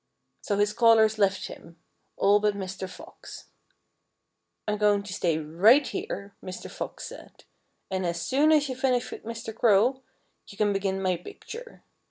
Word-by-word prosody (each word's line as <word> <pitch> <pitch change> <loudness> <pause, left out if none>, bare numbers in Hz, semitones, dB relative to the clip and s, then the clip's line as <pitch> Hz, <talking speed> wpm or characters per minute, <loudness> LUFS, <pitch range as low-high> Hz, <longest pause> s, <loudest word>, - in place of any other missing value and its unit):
So 205 - -1
his 205 +1 +2
callers 220 -1 +4
left 195 -1 +2
him 165 0 -11 0.4
all 205 +1 +4
but 210 -1 +1
Mr. 190 -1 -5
Fox. 180 - -12 1.2
"I'm 210 0 -1
going 205 -1 +3
to 200 -2 -7
stay 170 -4 0
right 185 - +4
here," 200 0 -5
Mr. 185 -1 -7
Fox - - -6
said. - - -12 0.5
"And 190 0 -1
as 170 -1 -1
soon 270 - +2
as 300 -2 +4
you 260 - -4
finish 255 -2 0
with - - -8
Mr. 230 -1 -6
Crow, 235 +4 +3 0.5
you 200 - -13
can 210 -1 +2
begin 195 -1 -1
my 185 -2 +1
picture." 470 - -11
205 Hz, 160 wpm, -27 LUFS, 190-230 Hz, 1.2 s, callers